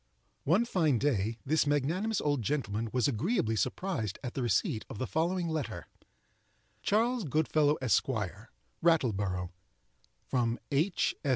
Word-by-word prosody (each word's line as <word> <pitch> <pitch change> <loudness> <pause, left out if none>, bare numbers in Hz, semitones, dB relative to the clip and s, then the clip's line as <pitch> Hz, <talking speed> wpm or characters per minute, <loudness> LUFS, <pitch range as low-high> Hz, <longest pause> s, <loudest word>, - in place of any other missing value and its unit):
One 185 +11 +3
fine 160 - +2
day, 115 -4 0
this 155 +2 +2
magnanimous 165 +10 +1
old 145 -3 +1
gentleman 115 -3 -1
was 125 +2 +2
agreeably 125 - 0
surprised 120 - -2
at 125 - -4
the 135 - -3
receipt 110 -1 +1
of - - -7
the 130 - -2
following 170 +5 0
letter: 150 - -4 0.9
Charles 230 +3 +1
Goodfellow, 155 -1 +2
Esq., 125 - +3 0.7
Rattleborough 100 - +1 0.7
From 120 -2 0
H. 160 +7 +1
145 Hz, 120 wpm, -31 LUFS, 115-165 Hz, 0.9 s, One